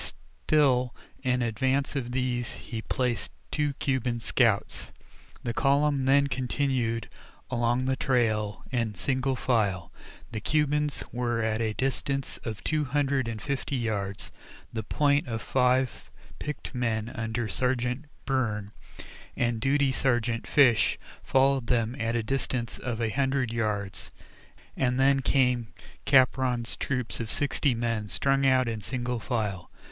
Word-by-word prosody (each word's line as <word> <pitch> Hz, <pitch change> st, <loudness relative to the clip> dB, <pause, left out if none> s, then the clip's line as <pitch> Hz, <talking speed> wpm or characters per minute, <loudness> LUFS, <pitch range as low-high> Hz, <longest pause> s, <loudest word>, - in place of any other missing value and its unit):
Still 130 Hz, -5 st, +3 dB, 0.3 s
in 125 Hz, -2 st, +1 dB
advance 130 Hz, +5 st, 0 dB
of 125 Hz, -3 st, -2 dB
these 125 Hz, -1 st, -1 dB
he 115 Hz, -2 st, -6 dB
placed 120 Hz, -2 st, -1 dB, 0.2 s
two 150 Hz, -2 st, 0 dB
Cuban 130 Hz, -3 st, -1 dB
scouts. -, -, +1 dB, 0.5 s
The 120 Hz, -, -2 dB
column 140 Hz, +1 st, +2 dB
then 140 Hz, +1 st, +5 dB
continued 125 Hz, -3 st, -1 dB, 0.4 s
along 120 Hz, +1 st, +1 dB
the 130 Hz, 0 st, +1 dB
trail 110 Hz, -6 st, 0 dB
in 115 Hz, -5 st, -1 dB
single 130 Hz, +8 st, 0 dB
file. 100 Hz, -9 st, 0 dB, 0.4 s
The 110 Hz, -, -3 dB
Cubans 150 Hz, +3 st, +1 dB
were 120 Hz, -1 st, -1 dB
at 110 Hz, 0 st, 0 dB
a 110 Hz, -1 st, 0 dB
distance 135 Hz, +2 st, -2 dB
of 110 Hz, -3 st, -6 dB
two 155 Hz, -1 st, +1 dB
hundred 140 Hz, -2 st, +1 dB
and 115 Hz, -2 st, -4 dB
fifty 140 Hz, +3 st, -2 dB
yards; 100 Hz, -5 st, -2 dB, 0.4 s
the 110 Hz, -, -2 dB
"point" 145 Hz, +5 st, +2 dB
of 115 Hz, -2 st, -2 dB
five 125 Hz, +1 st, +1 dB, 0.3 s
picked 150 Hz, -1 st, -5 dB
men 115 Hz, -3 st, -1 dB
under 115 Hz, 0 st, -2 dB
Sergeant 125 Hz, +4 st, 0 dB, 0.2 s
Byrne 110 Hz, -7 st, -1 dB, 0.7 s
and 120 Hz, -2 st, 0 dB
duty 140 Hz, +1 st, +3 dB
Sergeant 120 Hz, -3 st, 0 dB
Fish 120 Hz, -8 st, +4 dB, 0.3 s
followed 135 Hz, -2 st, +3 dB
them 120 Hz, -1 st, +1 dB
at 115 Hz, 0 st, 0 dB
a 115 Hz, -, +1 dB
distance 125 Hz, -1 st, -2 dB
of 120 Hz, -3 st, -3 dB
a 115 Hz, -, +1 dB
hundred 135 Hz, -2 st, 0 dB
yards, 105 Hz, -4 st, -2 dB, 0.7 s
and 125 Hz, -1 st, +1 dB
then 135 Hz, +1 st, +5 dB
came 125 Hz, -3 st, +2 dB, 0.4 s
Capron's 130 Hz, -3 st, +3 dB
troop 125 Hz, -4 st, -2 dB
of 115 Hz, -2 st, -4 dB
sixty 140 Hz, -1 st, +1 dB
men 115 Hz, -3 st, -1 dB
strung 135 Hz, -, +2 dB
out 130 Hz, -1 st, +4 dB
in 110 Hz, -2 st, -3 dB
single 125 Hz, +3 st, -3 dB
file. 105 Hz, -6 st, -2 dB
125 Hz, 135 wpm, -28 LUFS, 115-135 Hz, 0.7 s, then